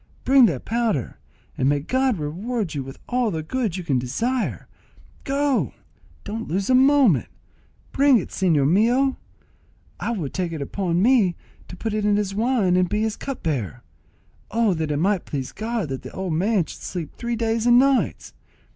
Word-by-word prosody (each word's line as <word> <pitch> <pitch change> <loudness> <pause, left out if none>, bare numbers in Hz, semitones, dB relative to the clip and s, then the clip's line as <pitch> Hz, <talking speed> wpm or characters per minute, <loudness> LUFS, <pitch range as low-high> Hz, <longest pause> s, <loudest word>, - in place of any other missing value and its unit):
bring 265 -3 +6
that 145 - -3
powder, 225 - -1 0.4
and 130 - +1
may 145 0 +2
God 260 - 0
reward 185 +6 -3
you 145 - -3
with 135 0 -9
all 245 -2 +1
the 160 -5 -3
good 215 0 -2
you 185 - -5
can 140 -6 +1
desire. 230 - -2 0.6
Go! 280 -1 0 0.5
don't 220 +2 -5
lose 195 +7 -1
a - - +5
moment—bring 265 - +2
it, 195 - -3
señor 160 -7 +2
mio; 240 - +3 0.8
I - - -3
will 170 -11 -3
take 175 0 -3
it 160 - -4
upon 175 +3 -1
me 220 -8 +4 0.3
to - - -9
put 225 +2 -3
it 215 -1 -1
in 205 0 +3
his 205 -2 -1
wine 215 -4 +2
and 180 -1 +2
to - - -6
be 215 - +1
his 220 -1 -1
cupbearer. 150 - -4 0.7
Oh, 225 -2 +2
that 160 -2 -2
it 145 - 0
might 190 +3 +1
please 135 -3 -4
God 220 -6 -3
that 135 -1 -4
the - - -9
old 190 -3 -3
man 190 +2 +1
should - - -11
sleep 175 -5 -5
three 235 0 -3
days 225 0 0
and 240 0 +7
nights! 270 +1 +1
205 Hz, 180 wpm, -23 LUFS, 165-240 Hz, 0.8 s, and